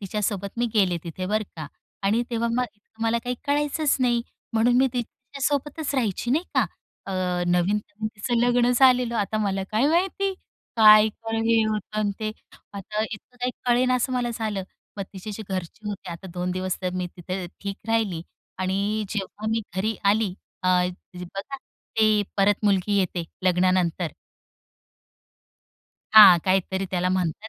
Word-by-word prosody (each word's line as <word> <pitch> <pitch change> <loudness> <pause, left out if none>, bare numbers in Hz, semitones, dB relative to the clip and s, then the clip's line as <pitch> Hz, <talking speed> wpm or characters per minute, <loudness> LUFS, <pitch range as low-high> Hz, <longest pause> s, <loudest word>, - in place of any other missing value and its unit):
तिच्यासोबत 200 0 -2
मी 240 - +2
गेले 185 -4 +3
तिथे. 175 +2 -5
बरं 215 +2 0
का, 155 -2 -5 0.4
आणि 210 +4 +2
तेव्हा 235 0 0
मग 250 +1 +2 0.4
मला 230 +1 +2
काही 250 0 -1
कळायचंच 295 +1 +1
नाही. 240 -2 +2 0.3
म्हणून 230 +2 +3
मी 265 - +5
तिच्यासोबतच 275 +4 -3
राहायची. 235 -2 -1
नाही 310 +7 +2
का? - - +3 0.4
अ, 195 - -4 0.3
नवीन-नवीन 205 +4 0
तिचं 225 +4 -1
लग्न 245 0 +3
झालेलं. 250 -2 +4
आता 210 +1 -1
मला 195 -2 0
काय 220 +6 +2
माहिती? 385 +4 +1 0.4
काय 215 -1 +8
हे 225 +1 0
होतं 215 0 -3
आणि 210 -1 +1
ते. 215 0 -1 0.4
आता 210 +2 -3
इतकं 220 +3 -10
काही 250 +1 0 0.2
कळेनासं 250 +1 +2
मला 245 -1 0
झालं. 215 -4 -2 0.3
मग 200 - -2
तिची 195 +2 -7
जी 220 - -6
घरचे 190 +2 -5
होते, 195 -3 -6
आता 170 +3 -8
2 180 +1 -2
दिवस 185 0 -2
तर 180 - 0
मी 180 -1 -2
तिथे 180 +1 -4
ठीक 200 -1 -4
राहिली. 215 -7 0 0.4
आणि 200 +3 0
जेव्हा 210 +1 -4
मी 225 0 +1
घरी 210 +4 0 0.2
आली 210 -3 +1 0.3
अ, 185 - +1 0.5
बघा 195 +9 -6 0.4
ते 215 -1 +4
परत 200 +1 +2
मुलगी 200 0 +2
येते 180 -2 -1 0.2
लग्नानंतर. 180 -2 +2 2.0
हां, 205 -5 +10
काहीतरी 190 0 +1
त्याला 180 -1 0
म्हणतात. 185 +3 -1
210 Hz, 150 wpm, -25 LUFS, 190-235 Hz, 2.0 s, हां